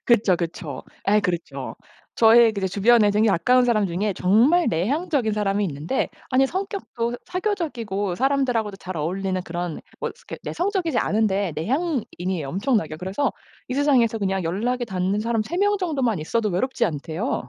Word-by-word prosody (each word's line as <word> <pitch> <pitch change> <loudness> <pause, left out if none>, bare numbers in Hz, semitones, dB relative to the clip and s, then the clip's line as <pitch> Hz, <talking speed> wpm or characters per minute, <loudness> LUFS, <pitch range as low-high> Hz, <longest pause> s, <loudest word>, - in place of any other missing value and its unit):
그쵸, 210 -6 +4
그쵸. 165 -5 -5 0.3
예 210 +1 +5
그렇죠. 175 -3 -4 0.4
저의 230 0 +6
그 195 -2 -2
주변에 210 +2 +4
되게 215 +2 +3
가까운 250 +7 +4
사람 215 -4 +2
중에 195 +4 -1
정말 240 - +4
내향적인 250 - 0
사람이 205 -1 0
있는데 155 - -2 0.2
아니 265 +1 +3
성격도 365 - -3
사교적이고 255 - -2
사람들하고도 250 -7 +1
잘 185 -2 -7
어울리는 185 +4 -2
그런 175 -1 -4 0.2
뭐 - - -3
스 - - -23
그니까 - - -8
내성적이지 355 - -1
않은데 200 -4 +1
내향인이에요 190 - -2
엄청나게. 195 - 0
그래서 190 - -1 0.4
이 255 - -3
세상에서 255 -6 +3
그냥 190 -3 -1
연락이 240 +9 -1
닿는 190 0 -1
사람 225 -1 0
3 345 +11 -5
명 410 +1 +2
정도만 270 - 0
있어도 215 +8 -1
외롭지 240 +7 0
않대요. 165 - -3
215 Hz, 380 characters per minute, -23 LUFS, 185-260 Hz, 0.4 s, 저의